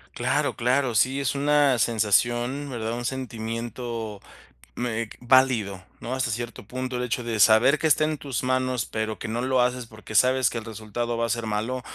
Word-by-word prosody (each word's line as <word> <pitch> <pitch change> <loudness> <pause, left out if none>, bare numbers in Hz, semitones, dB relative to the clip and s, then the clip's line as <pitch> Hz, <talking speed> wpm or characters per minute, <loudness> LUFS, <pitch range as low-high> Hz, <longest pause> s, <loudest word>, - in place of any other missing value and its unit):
Claro, - - 0
claro, 125 0 +1
sí, 130 +6 +2
es 140 0 -1
una 145 -2 +3
sensación, 120 +5 +1
¿verdad? 115 -3 -3
Un 120 +1 -4
sentimiento, 115 -3 -5 0.5
mm, 120 - -3
eh, 115 -2 -2
válido, 120 -7 +3 0.2
¿no? 125 +2 -3
Hasta 130 -3 -1
cierto 115 -2 -5
punto, 130 +1 -4
el 125 - -2
hecho 125 0 -2
de 115 -2 -3
saber 110 +8 +6
que 160 - +2
está 155 0 +4
en 155 0 0
tus 135 -3 -4
manos, 130 -2 0
pero 110 0 -3
que - - -5
no 115 +2 -2
lo 130 0 +2
haces, 125 0 0
porque 110 -1 -11
sabes 130 +1 +4
que - - -5
el 115 - -5
resultado 115 +2 -4
va 115 - +1
a - - -7
ser 115 +1 -1
malo, 110 +4 -2
120 Hz, 195 wpm, -25 LUFS, 110-130 Hz, 0.5 s, saber